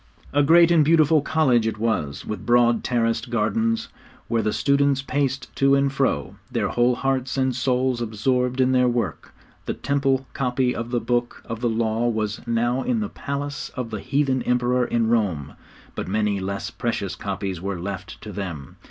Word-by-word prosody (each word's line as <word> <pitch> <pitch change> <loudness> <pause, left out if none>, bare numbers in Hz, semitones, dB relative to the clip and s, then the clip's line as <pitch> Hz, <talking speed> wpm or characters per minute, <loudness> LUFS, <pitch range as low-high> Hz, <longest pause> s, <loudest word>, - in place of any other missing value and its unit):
A 145 - +4
great 170 +3 +6
and 165 -3 +5
beautiful 155 0 +4
college 135 -7 +2
it 110 - -2
was, 100 -11 -2
with 105 - -5
broad 120 -1 +3
terraced 115 0 0
gardens, 225 - 0 0.4
where 115 -1 +1
the 110 0 0
students 140 +1 +2
paced 135 -1 -2
to 135 0 +4
and 140 0 +1
fro, 130 - -1
their - - 0
whole 120 +1 +2
hearts 130 0 -1
and 130 -2 +1
souls 130 -1 0
absorbed 125 +3 0
in 130 0 +3
their 125 -1 +4
work. 120 -1 -2 0.4
The - - -2
Temple 135 -1 0
copy 125 -1 0
of 115 0 -4
the 120 -1 0
Book 120 +1 -2
of 115 -1 -5
the 120 - +1
Law 115 +1 0
was 110 -2 -2
now 120 +2 +1
in 240 - 0
the 210 -2 -2
palace 145 0 -4
of 125 -3 -4
the 110 - -3
heathen 135 +2 0
Emperor 125 0 +1
in 115 -1 +1
Rome, 95 -11 0 0.4
but - - -5
many 105 0 0
less 100 +1 -4
precious 100 -6 -3
copies 95 -3 -4
were 95 -1 -3
left 95 +1 -6
to 105 - -8
them. 90 -9 -6
120 Hz, 180 wpm, -23 LUFS, 110-135 Hz, 0.4 s, great